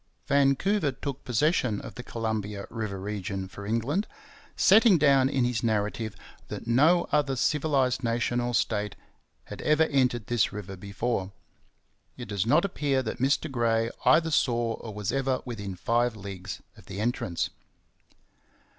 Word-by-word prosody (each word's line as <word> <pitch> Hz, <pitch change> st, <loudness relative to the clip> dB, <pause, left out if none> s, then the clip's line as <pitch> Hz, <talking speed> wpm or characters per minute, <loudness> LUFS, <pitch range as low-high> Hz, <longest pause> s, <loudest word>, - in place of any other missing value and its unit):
Vancouver 140 Hz, +5 st, +2 dB
took 135 Hz, +1 st, -6 dB
possession 125 Hz, -, +1 dB
of -, -, -9 dB
the -, -, -7 dB
Columbia 110 Hz, -4 st, -3 dB
river 110 Hz, -4 st, -4 dB
region 95 Hz, -1 st, -4 dB
for 100 Hz, +1 st, -9 dB
England, 125 Hz, -, 0 dB, 0.5 s
setting 210 Hz, -1 st, +6 dB
down 140 Hz, -3 st, +4 dB
in 135 Hz, -2 st, +1 dB
his 120 Hz, -2 st, -1 dB
narrative 110 Hz, -1 st, -1 dB, 0.3 s
that -, -, -7 dB
'no 150 Hz, +9 st, +4 dB
other 145 Hz, -3 st, +2 dB
civilized 135 Hz, -2 st, +1 dB
nation 120 Hz, +1 st, 0 dB
or 120 Hz, 0 st, -1 dB
state 105 Hz, -3 st, 0 dB, 0.5 s
had -, -, -9 dB
ever 150 Hz, +1 st, +3 dB
entered 125 Hz, -7 st, +1 dB
this 120 Hz, -3 st, +1 dB
river 100 Hz, -1 st, -7 dB
before... 100 Hz, +1 st, -3 dB, 0.9 s
it 120 Hz, -, -6 dB
does 100 Hz, 0 st, -1 dB
not 150 Hz, +9 st, +4 dB
appear 140 Hz, -8 st, 0 dB
that 110 Hz, -, -4 dB
Mr 135 Hz, +4 st, +2 dB
Gray 115 Hz, -2 st, +1 dB
either 165 Hz, 0 st, +4 dB
saw 120 Hz, -5 st, +1 dB
or 110 Hz, -, -8 dB
was 105 Hz, -1 st, -3 dB
ever 135 Hz, -1 st, 0 dB
within 100 Hz, -6 st, -5 dB
five 115 Hz, +6 st, +1 dB
leagues 95 Hz, -3 st, -7 dB
of -, -, -17 dB
the 95 Hz, -, -6 dB
entrance.' 105 Hz, -6 st, -1 dB
120 Hz, 145 wpm, -27 LUFS, 105-135 Hz, 0.9 s, setting